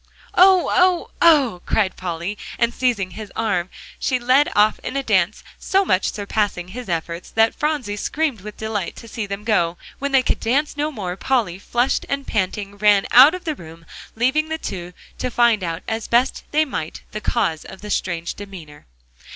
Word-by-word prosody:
"Oh! 370 0 +5
oh! 365 -1 +3
oh!" 275 - +5
cried 200 -4 +1
Polly, 175 +2 -4 0.2
and 235 0 +1
seizing 230 -8 0
his 215 -1 -8
arm, 200 -5 0 0.3
she 255 - +1
led 255 +4 +3
off 210 +1 +4
in 275 - -4
a 275 - -1
dance, 195 -4 +1 0.2
so 390 +1 +2
much 185 - +1
surpassing 205 -3 -2
his 240 +2 -8
efforts, 170 +1 -3
that 225 0 +3
Phronsie 290 -9 -2
screamed 285 -2 -1
with 210 +1 -9
delight 215 -4 -3
to 230 - -11
see 220 -1 -5
them 200 +1 -5
go. 180 -6 +1 0.2
When 280 0 -2
they 265 -1 +4
could - - 0
dance 280 +7 0
no 295 +1 -1
more, 190 -9 -4
Polly, 200 -5 0
flushed 240 +5 0
and 280 0 -2
panting, 200 0 -2
ran 205 -1 +4
out 275 +8 +8
of 365 - -8
the 315 - -1
room, 165 - -13 0.3
leaving 265 +7 +1
the 320 - -2
two 180 - -6 0.3
to - - -1
find 235 -4 +3
out 165 -1 -4
as 220 0 -3
best 240 +3 +1
they 310 +1 +2
might, 165 - -5
the 215 - -5
cause 160 -5 0
of 190 - -11
the 210 0 -6
strange 170 -2 -2
demeanor. 175 -8 -11
215 Hz, 185 wpm, -21 LUFS, 185-265 Hz, 0.3 s, out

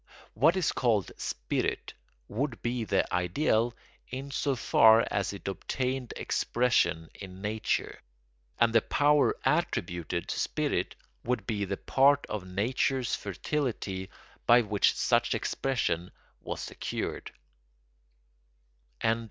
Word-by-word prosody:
What 155 - +4
is 180 -6 +1
called 110 -7 +1
spirit - - -2 0.3
would 120 +3 -3
be 120 -1 -1
the 100 -2 +2
ideal 110 - +1 0.3
in 135 +2 -6
so 140 0 0
far 115 -2 +5
as 100 - 0
it 100 -1 -9
obtained 125 +5 -2
expression 85 -10 +1
in 95 -2 -10
nature; 110 +1 -1 0.6
and 115 -1 +3
the 115 - +6
power 145 +3 +3
attributed 85 - -1
to - - -2
spirit - - -1 0.3
would 125 +1 -1
be 105 -4 -1
the 100 0 -3
part 140 +1 +3
of 100 -3 -4
nature's 120 +6 0
fertility 100 - -3 0.4
by 120 +1 +7
which 105 -2 +2
such - - +2
expression 120 -10 -1 0.3
was - - -5
secured. - - -4
115 Hz, 110 wpm, -29 LUFS, 100-135 Hz, 0.6 s, by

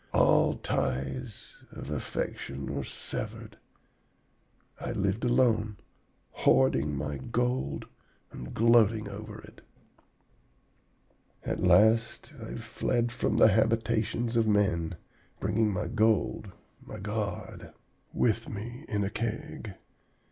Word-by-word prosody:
All - - +4
ties 100 - -3
of 75 - -8
affection 70 -2 -4
were 70 -1 -2
severed. - - -6 1.2
I - - -3
lived 100 +3 0
alone, 115 -4 +2 0.5
hoarding 70 +2 +3
my 75 0 -3
gold 120 - -1 0.5
and 60 - -8
gloating 115 -2 +4
over 105 +2 -8
it. - - -15 1.8
"'At - - -2
last 110 - +3
I 110 - -6
fled 120 +1 -1
from 120 - 0
the - - +7
habitations 115 +2 +1
of 115 -1 +3
men, 95 -5 +2 0.4
bringing 110 -1 +1
my 95 - -2
gold, 110 -2 +1 0.3
my - - -8
god, 105 -1 -4 0.4
with 115 0 +1
me 120 +7 -7
in 105 -4 0
a 100 - -2
Keg. 110 -2 -4
110 Hz, 105 wpm, -29 LUFS, 95-115 Hz, 1.8 s, the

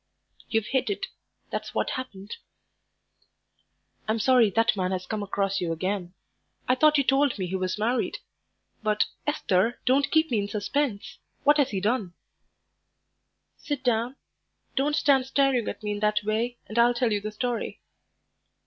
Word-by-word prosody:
"You've 225 -2 +1
hit 260 +1 0
it, 200 -1 -2 0.5
that's - - -4
what - - 0
happened." 210 -6 -6 1.7
"I'm 220 +1 +1
sorry 240 -1 +5
that 225 +2 +2
man 185 -2 0
has 185 -1 -3
come 215 +1 -3
across 195 -1 -1
you 170 -2 -1
again. 185 +1 -3 0.5
I 255 - +4
thought 305 +3 +4
you 280 - +3
told 270 0 +2
me 190 - -2
he 180 +2 -3
was 185 +1 -1
married. 235 +4 0 0.6
But, 215 -1 +2 0.2
Esther, 225 -6 +1
don't 270 +2 +3
keep 315 -2 +2
me 225 - +2
in 200 - -2
suspense; 210 +2 -2 0.2
what 295 +1 +5
has 280 -3 +3
he 195 - -2
done?" 205 -3 -1 1.4
"Sit 290 -3 -4
down; 240 +1 +1 0.6
don't 290 +2 +1
stand 275 -3 +3
staring 265 -4 +2
at - - -5
me 210 - -2
in 205 - -3
that 210 0 +1
way, 225 +3 -1
and 215 +2 -2
I'll 240 +1 +5
tell 240 -1 +1
you 205 -1 0
the 215 +1 -4
story." 245 +2 -3
225 Hz, 160 wpm, -26 LUFS, 205-260 Hz, 1.7 s, sorry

